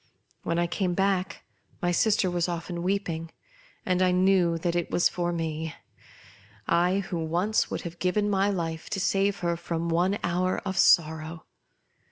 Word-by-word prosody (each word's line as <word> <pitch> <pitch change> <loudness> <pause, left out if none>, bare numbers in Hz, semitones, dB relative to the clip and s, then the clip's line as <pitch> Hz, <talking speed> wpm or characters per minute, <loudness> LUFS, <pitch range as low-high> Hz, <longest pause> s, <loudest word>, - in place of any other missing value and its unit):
When 170 - -2
I 175 - +2
came 180 +1 -1
back 190 -1 0 0.4
my' 175 - 0
sister 195 0 +2
was 175 0 0
often 170 0 -4
weeping, 175 -3 -2 0.6
and 185 -1 +1
I 185 - +4
knew 180 -2 +3
that 170 +1 -1
it 175 -1 -1
was 175 - +3
for 175 -1 -2
me 160 -1 -3 0.5
— - - -23 0.2
I, 180 +3 +2
who 180 -3 -4
once 175 +7 0
would - - -3
have 170 -1 -8
given 205 +3 +1
my 200 0 +2
life 165 -4 -3
to - - -2
save 195 +1 +1
her 170 -1 0
from 170 0 -3
one 180 +4 +2
hour 180 +2 0
of 190 -1 -2
sorrow. 160 0 +3
175 Hz, 170 wpm, -27 LUFS, 170-190 Hz, 0.6 s, I